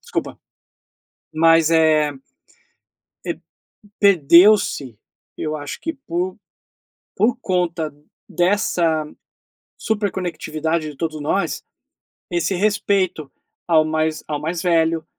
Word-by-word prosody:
desculpa, - - -4 1.0
mas 165 0 +4
é, 155 -2 +3 1.1
eh, - - -3 0.6
perdeu-se, 175 - +4 0.4
eu 155 0 -3
acho 145 -1 -7
que 325 - -2
por 185 - -4 0.8
por 235 +4 +2
conta 170 -4 -1 0.4
dessa 175 -4 +1 0.7
super 210 -2 -1
conectividade 160 -3 -3
de 145 - -13
todos 155 -1 -4
nós, 160 +7 -1 0.7
esse 175 +2 -1
respeito 190 -6 0 0.4
ao 160 -2 +5
mais 155 0 -1
ao 145 -1 -2
mais 165 +2 -3
velho, 165 -2 +1
165 Hz, 95 wpm, -20 LUFS, 155-185 Hz, 1.1 s, ao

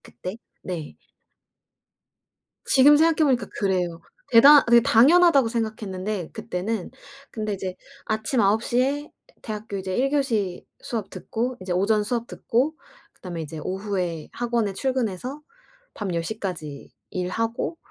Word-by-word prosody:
그때 185 - -8 0.3
네. 170 -5 -6 1.7
지금 285 +2 +6
생각해 320 0 +4
보니까 255 -4 +1
그래요. 180 -4 -1 0.3
대단 280 +5 +9
그게 235 0 +6
당연하다고 280 +3 +5
생각했는데 210 -5 -3
그때는. 220 -2 -4 0.4
근데 215 -2 -3
이제 190 -1 -5 0.3
아침 220 +3 -1
9 210 +3 +3
시에 275 +5 0 0.3
대학교 215 -2 -5
이제 190 -1 -3
1 265 +2 +2
교시 225 -11 -1 0.2
수업 220 -5 -4
듣고 245 +2 -4
이제 185 -1 -3
오전 210 +4 +2
수업 235 +2 -2
듣고 270 +7 -1 0.4
그다음에 175 -3 -7
이제 155 0 -7
오후에 185 -5 -3
학원에 235 -4 -1
출근해서 255 +2 -2 0.5
밤 200 -4 -4
10 165 - -1
시까지 175 -7 -6 0.2
일하고 225 - -2
220 Hz, 270 characters per minute, -24 LUFS, 185-250 Hz, 1.7 s, 대단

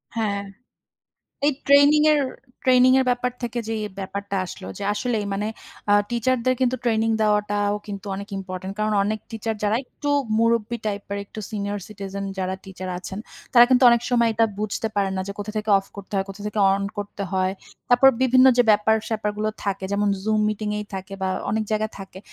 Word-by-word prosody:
হ্যাঁ। 205 -3 -1 1.1
এই 295 - +4
ট্রেনিং 285 +2 +6
এর 300 - +3 0.4
ট্রেনিং 255 0 +6
এর 265 - +3
ব্যাপার 245 0 0
থেকে 240 0 -3
যেই 220 -1 -2 0.2
ব্যাপারটা 200 +1 -4
আসলো 135 - -9
যে - - -4
আসলেই 225 -2 -1
মানে 200 +2 -1 0.4
আ - - +6 0.2
টিচারদের 255 +1 +1
কিন্তু 255 0 +2
ট্রেনিং 225 -1 +2
দেওয়াটাও 205 -1 +1
কিন্তু 200 -1 -7
অনেক 200 +1 -7
ইম্পোর্টেন্ট 190 0 -6
কারণ 215 0 0
অনেক 215 +2 -1
টিচার 225 0 -3
যারা 210 +2 +2
একটু 290 - -7 0.3
মুরুব্বি 230 0 +2
টাইপের 200 -1 -3
একটু 215 - -9
সিনিয়র 205 -1 -3
সিটিজেন 200 -1 -6
যারা 185 0 -1
টিচার 185 -1 -7
আছেন, 190 +1 -7 0.3
তারা 240 -1 +9
কিন্তু 255 0 +4
অনেক 235 0 +3
সময় 235 -2 +3
এটা 225 +1 +3 0.2
বুঝতে 215 +1 -2
পারেন 195 -1 +1
না 190 - -1
যে - - -3
কোথা 205 +1 -4
থেকে 215 0 -1
অফ 195 - -8
করতে 200 0 -10
হয়, 195 - +1 0.5
অন 200 - -3 0.2
করতে 205 0 -5
হয়। 185 0 +1 0.4
তারপর 245 +2 +7
বিভিন্ন 255 0 +6
যে 245 - +6
ব্যাপার-স্যাপার 215 0 +1
গুলো 215 0 0
থাকে 195 -1 -2
যেমন 205 0 +1
Zoom 215 +1 +1
মিটিং 215 0 -3
এই 210 - -4
থাকে 190 +1 -6
বা 190 - +1 0.2
অনেক 220 +1 0
জায়গায় 215 0 0
থাকে। 195 -1 -10
215 Hz, 180 wpm, -23 LUFS, 200-235 Hz, 1.1 s, তারা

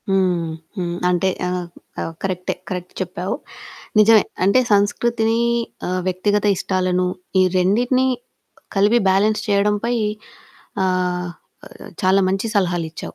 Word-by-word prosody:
హ్మ్. 180 -4 +1 0.3
హ్మ్. 175 -2 -2
అంటే 180 +1 +2 0.2
ఆహ్, 180 -1 -2 0.3
ఆహ్, 165 - -4
కరెక్టే. 185 -2 -2 0.2
కరెక్ట్ 180 -1 -5
చెప్పావు. 180 +2 -3 0.6
నిజమే 215 0 +7 0.2
అంటే 200 +7 +5
సంస్కృతిని 225 +3 +2 0.5
ఆహ్, 185 0 -1
వ్యక్తిగత 205 +3 +1
ఇష్టాలను 185 -1 0 0.3
ఈ - - +6 0.2
రెండిటిని 245 +8 +2 0.7
కలిపి 205 +4 +4
బ్యాలన్స్ 210 +3 +3
చేయడం 205 0 +2
పై 240 +1 +1 0.9
ఆహ్, 180 -1 0 0.7
చాలా 190 +1 +4
మంచి 195 +3 -1
సలహాలిచ్చావు. 175 -5 -1
190 Hz, 110 wpm, -20 LUFS, 180-210 Hz, 0.9 s, నిజమే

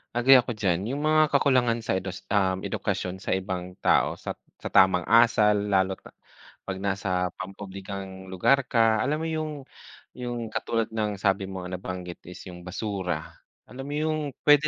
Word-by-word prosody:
Agree 130 +3 +7
ako 125 -1 +4
dyan. 95 -5 0
Yung 145 +2 -1
mga 155 0 +4
kakulangan 125 -5 +3
sa 110 - -1
edos 95 0 -5
um, 95 -2 +2
edukasyon 95 +1 -3
sa - - -2
ibang 90 -1 -3
tao - - +2
sat - - -5 0.2
sa - - -5
tamang 95 -2 +4
asal, 110 -2 +5 0.2
lalo't, 95 -1 +1
ah, - - -13 0.6
'pag 95 - -3
nasa 95 -2 0
pampublikong 95 0 -7
lugar 125 +9 +2
ka. 115 -2 +3
Alam 145 +7 +1
mo 165 - -1
yung 155 -1 -2 0.6
yung 120 -3 -5
katulad 115 0 -1
ng 105 -2 -1
sabi 95 0 0
mo, 95 -1 -6
nabanggit 90 -1 -6
is 90 - -9
yung 90 - -10
basura. 95 -1 -3 0.5
Alam 135 +2 -7
mo 145 - -4
yung 155 +1 0 0.2
pwede 150 0 +6
100 Hz, 165 wpm, -26 LUFS, 95-120 Hz, 0.6 s, Agree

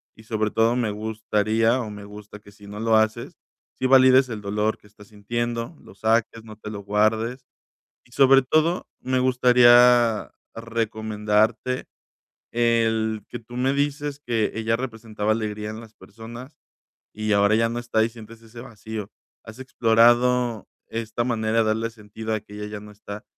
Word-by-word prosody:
y 110 - -16
sobre 110 -1 -1
todo 115 +2 +2
me 120 -3 0
gustaría 110 +2 0
o 110 -4 -5
me 105 0 -9
gusta 105 0 -11
que 100 0 -17
si 100 0 -17
no 105 +1 -8
lo 115 0 +2
haces, 110 0 -1 0.4
sí - - -2
valides 130 0 +6
el 110 -3 -6
dolor 105 +2 -1
que - - -21
estás 105 0 -18
sintiendo, 120 +6 -4
lo - - -16
saques, 110 +2 0
no 110 -1 -11
te 105 0 -9
lo 105 - -6
guardes. 110 +5 0 0.6
Y 120 - -27
sobre 135 +1 +5
todo, 155 +6 +1
me 130 0 -1
gustaría 125 -2 +5 0.2
recomendarte 110 +1 -1 0.7
el 115 -2 +1
que 120 - -7
tú 120 +1 -14
me 130 +2 +1
dices 145 0 -2
que 115 -3 0
ella 115 0 0
representaba 115 -4 -4
alegría 105 -1 -2
en 110 - -7
las 110 -1 -15
personas 120 +7 -12 0.5
y 110 0 -2
ahora 100 +1 +4
ya 115 0 +2
no 120 +1 -3
está 115 -2 +1
y - - -1
sientes 115 -1 -13
ese 115 +1 -13
vacío. 110 -4 -8 0.3
¿Has 110 +2 -12
explorado 120 -1 +2 0.2
esta 115 +1 -3
manera 115 -2 0
de 115 - +4
darle 110 +1 -1
sentido 110 0 -7
a 110 - 0
que 105 - -15
ella 105 0 -6
ya 105 0 -6
no 105 0 -12
está, 105 0 -10
115 Hz, 170 wpm, -23 LUFS, 105-120 Hz, 0.7 s, valides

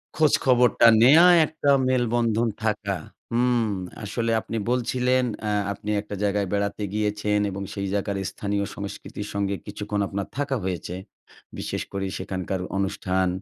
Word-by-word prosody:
খোঁজ 155 -2 +3
খবরটা 125 -2 +5
নেয়া 150 +8 +8 0.2
একটা 155 -2 -2 0.2
মেলবন্ধন 120 -2 +1
থাকা। 105 -3 -1 0.3
হুম। 120 -1 +2 0.4
আসলে 115 +3 -1
আপনি 115 - -5
বলছিলেন, 125 +1 +1 0.2
অ্যা 105 -1 0 0.2
আপনি 105 - -8
একটা 105 -1 -7
জায়গায় 100 -1 +1
বেড়াতে 100 +1 -1
গিয়েছেন 105 0 0
এবং 100 - -5
সেই 100 -1 -3
জায়গার 100 0 -1
স্থানীয় 100 0 -2
সংস্কৃতির 100 +1 -6
সঙ্গে 100 0 -1
কিছুক্ষণ 105 0 -4
আপনার 100 0 -4
থাকা 145 -1 0
হয়েছে। 90 -1 -3 0.6
বিশেষ - - -3
করে 95 0 -3
সেখানকার 95 0 -3 0.2
অনুষ্ঠান, 95 -1 0
105 Hz, 135 wpm, -25 LUFS, 100-120 Hz, 0.6 s, নেয়া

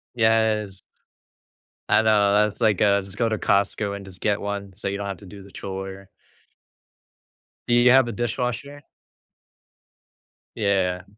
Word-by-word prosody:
Yes. 110 -4 +1 1.1
I - - +4
know 105 -2 +3
that's, 105 +2 +1
like, 110 -3 +2
uh, 100 -1 +4
just 95 +1 -9
go 115 - +1
to 110 - -1
Costco 100 +1 0
and 100 -1 -9
just 95 -2 -12
get 105 -1 +1
one, 100 -1 -5
so 100 - -5
you 100 - -2
don't 100 0 -5
have 100 -2 -5
to 100 - -14
do 100 +1 -12
the 100 - -15
chore. 95 0 -7 1.6
Do 120 - +1
you 120 +1 +5
have 130 -1 +5
a 120 - -3
dishwasher? 125 +5 -4 1.7
Yeah. 95 -3 0
100 Hz, 150 wpm, -23 LUFS, 100-110 Hz, 1.7 s, you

